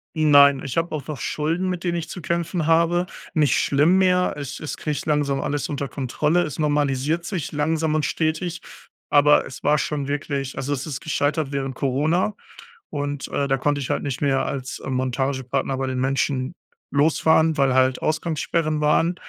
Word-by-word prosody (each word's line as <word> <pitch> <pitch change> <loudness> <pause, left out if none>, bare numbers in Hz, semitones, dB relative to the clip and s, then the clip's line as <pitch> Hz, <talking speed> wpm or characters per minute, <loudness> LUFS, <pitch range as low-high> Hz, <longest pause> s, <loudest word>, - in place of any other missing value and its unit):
Nein, 145 -3 +6
ich 135 - -5
hab 165 +1 0
auch 155 -3 -5
noch 150 -3 -6
Schulden, 165 +5 -1
mit 180 -1 -3
denen 175 -1 0
ich 165 -1 -4
zu 180 - -6
kämpfen 170 0 -2
habe. 170 +2 +3 0.3
Nicht 150 -3 +3
schlimm 150 +6 +3
mehr 180 -1 +3
Es 140 -2 -6
es 155 - -5
krieg 155 - -4
ich - - -6
langsam 145 -2 +1
alles 145 0 -2
unter 140 -1 -3
Kontrolle. 150 +6 0
Es 150 - -5
normalisiert 150 +1 0
sich 175 -6 -4
langsam 155 +1 0
und 155 -1 +1
stetig, 165 +3 -1 0.5
aber 145 0 +5
es 130 - -9
war 150 +1 +3
schon 140 -1 -2
wirklich 140 -2 -3
also 135 +2 -3
es 135 -2 -2
ist 145 -3 -5
gescheitert 150 -1 -1
während 135 -1 -3
Corona 155 +9 +1 0.6
und 145 -1 -3
äh, 140 -1 -1
da 135 - +2
konnte 145 +1 0
ich 130 - -5
halt - - -1
nicht 140 -2 -4
mehr 135 -2 +1
als 130 -1 -4
äh - - -7
Montagepartner 130 +1 -1
bei 135 0 -2
den 130 -1 -2
Menschen 135 0 0 0.4
losfahren, 160 +2 +3
weil 135 -2 +3
halt 130 0 +2
Ausgangssperren 155 0 -1
waren. 155 +3 +2
145 Hz, 185 wpm, -23 LUFS, 135-160 Hz, 0.6 s, Nein